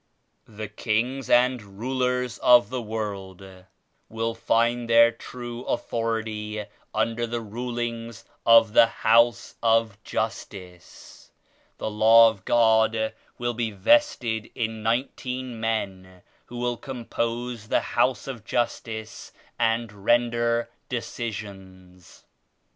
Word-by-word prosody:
The 110 0 -7
kings 115 +5 -2
and 120 -5 +2
rulers 125 +1 -1
of 120 0 +5
the 130 -1 -2
world 100 -4 -5 0.6
will 115 +1 -2
find 115 +1 0
their 115 0 +7
true 120 +1 -8
authority 110 -3 -3 0.3
under 115 +1 -1
the 120 +1 -3
rulings 115 0 -5 0.2
of 115 -2 +6
the 115 - +7
House 115 +1 +2
of 115 -2 +1
Justice. 95 -5 -6 0.5
The 110 - -4
Law 115 +2 +7
of 100 -4 -16
God 110 -1 +3 0.2
will 120 0 -2
be 115 -1 -2
vested 110 - +2
in 110 -1 -3
nineteen 125 +1 -2
men 95 -5 -3 0.2
who 120 - -9
will 120 0 -1
compose 120 -2 -4
the - - +2
liouse 125 0 0
of 125 -5 -6
Justice 110 -2 -3 0.3
and 115 -1 +1
render 120 0 +2 0.2
decisions. 95 -7 -7
115 Hz, 105 wpm, -25 LUFS, 110-120 Hz, 0.6 s, their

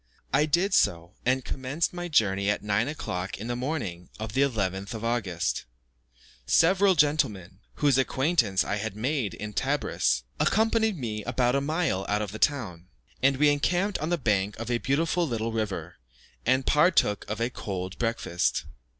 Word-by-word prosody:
I 150 - +4
did 175 +6 +2
so, 85 - +2
and 130 0 +2
commenced 135 +7 -2
my 175 0 -4
journey 100 - +2
at 105 - 0
9 105 +3 +1
o'clock 95 -11 -4
in 105 - -7
the 120 +1 -2
morning 120 - -4
of 110 -1 -5
the 135 - +2
11th 100 -6 -1
of 110 +1 -5
August. 100 - -1 0.8
Several 190 - +4
gentlemen, 105 - +1 0.2
whose 140 -3 +3
acquaintance 130 - +2
I 100 - -2
had 110 -1 -4
made 115 - -1
in 105 +3 -6
Tebris, 110 - 0 0.2
accompanied 220 -2 +2
me 110 -6 -4
about 125 +2 +1
a 140 - +2
mile 155 - -1
out 105 +1 +1
of 100 - -5
the 110 - -7
town, 100 - 0 0.3
and 135 +1 +3
we 150 +1 +5
encamped 175 +7 +1
on 155 - -2
the 175 - +1
bank 105 -6 0
of 115 +2 -4
a 120 - +1
beautiful 165 +6 +1
little 115 -3 -2
river, 110 -3 -3 0.5
and 130 +1 +3
partook 150 - +3
of 105 - -3
a 120 +2 0
cold 95 -4 -5
breakfast. 115 -6 0
120 Hz, 165 wpm, -27 LUFS, 100-150 Hz, 0.8 s, we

